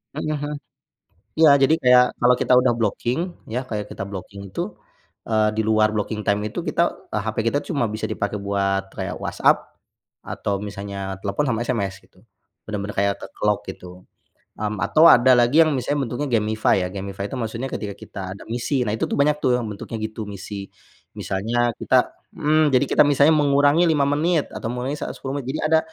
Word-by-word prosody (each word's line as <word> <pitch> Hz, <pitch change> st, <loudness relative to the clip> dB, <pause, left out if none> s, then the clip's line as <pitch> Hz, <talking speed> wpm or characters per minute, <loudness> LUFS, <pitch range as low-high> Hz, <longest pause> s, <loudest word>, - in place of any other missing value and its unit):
Mhm 155 Hz, +1 st, -2 dB
mhm. 145 Hz, 0 st, -3 dB, 0.9 s
Iya 160 Hz, -2 st, +8 dB
jadi 145 Hz, +4 st, +4 dB
kayak 125 Hz, 0 st, +6 dB
kalau 125 Hz, +1 st, +5 dB
kita 125 Hz, -, +1 dB
udah 125 Hz, -1 st, +2 dB
blocking 120 Hz, +4 st, -1 dB, 0.3 s
ya, 125 Hz, +4 st, -3 dB
kayak 105 Hz, -5 st, -5 dB
kita -, -, -6 dB
blocking 100 Hz, 0 st, -8 dB
itu, 175 Hz, -, -4 dB, 0.5 s
eee, 110 Hz, -1 st, +2 dB
di 110 Hz, -, 0 dB
luar 110 Hz, 0 st, +2 dB
blocking 105 Hz, 0 st, -3 dB
time 100 Hz, +1 st, +1 dB
itu 105 Hz, -, -4 dB
kita -, -, +1 dB, 0.2 s
hape -, -, -3 dB
kita 145 Hz, +5 st, 0 dB
tuh -, -, -6 dB
cuma 140 Hz, -7 st, 0 dB
bisa 110 Hz, +1 st, -6 dB
dipakai 105 Hz, 0 st, -2 dB
buat 100 Hz, -1 st, -1 dB
kayak -, -, -5 dB
WhatsApp -, -, 0 dB, 0.5 s
atau 100 Hz, -1 st, -2 dB
misalnya 100 Hz, -1 st, -5 dB
telepon 100 Hz, +9 st, -1 dB
sama 115 Hz, -1 st, 0 dB
SMS 100 Hz, -6 st, -2 dB
gitu. 95 Hz, 0 st, -25 dB, 0.5 s
Benar-benar 105 Hz, -1 st, -4 dB
kayak 100 Hz, 0 st, +2 dB, 0.2 s
ke-lock 105 Hz, -1 st, 0 dB
gitu. 90 Hz, -1 st, -10 dB, 0.5 s
Mmm, 105 Hz, 0 st, -3 dB
atau 155 Hz, -, +4 dB
ada 130 Hz, +2 st, +6 dB
lagi 120 Hz, +7 st, +4 dB
yang 155 Hz, -, +1 dB
misalnya 135 Hz, +1 st, -1 dB
bentuknya 140 Hz, +5 st, -3 dB
gamify 110 Hz, 0 st, +1 dB
ya, -, -, -2 dB
gamify 100 Hz, 0 st, -5 dB
tuh 135 Hz, -, -6 dB
maksudnya 115 Hz, +3 st, -3 dB
ketika 105 Hz, -, -4 dB
kita 100 Hz, -, -10 dB, 0.2 s
ada -, -, -12 dB
misi, 125 Hz, +3 st, -1 dB
nah 105 Hz, -, -1 dB
itu -, -, -1 dB
tuh -, -, -1 dB
banyak 150 Hz, +1 st, +3 dB
tuh 125 Hz, -1 st, +3 dB
yang 120 Hz, -, -4 dB
bentuknya 105 Hz, +2 st, -6 dB
gitu 110 Hz, 0 st, -4 dB
misi. 100 Hz, 0 st, -7 dB, 0.5 s
Misalnya 115 Hz, +4 st, -1 dB
kita -, -, +2 dB, 0.2 s
mmm, 155 Hz, 0 st, +3 dB
jadi 130 Hz, -, +4 dB
kita -, -, +6 dB
misalnya 145 Hz, +2 st, +4 dB
mengurangi 145 Hz, +2 st, +4 dB
5 150 Hz, -4 st, +3 dB
menit 155 Hz, +2 st, +1 dB
atau -, -, -5 dB
mengurangi 125 Hz, +3 st, -3 dB
saat -, -, -4 dB
10 135 Hz, +1 st, -4 dB
menit, 130 Hz, -, -8 dB
jadi -, -, -2 dB
ada 160 Hz, -, +5 dB
115 Hz, 185 wpm, -22 LUFS, 100-140 Hz, 0.9 s, Iya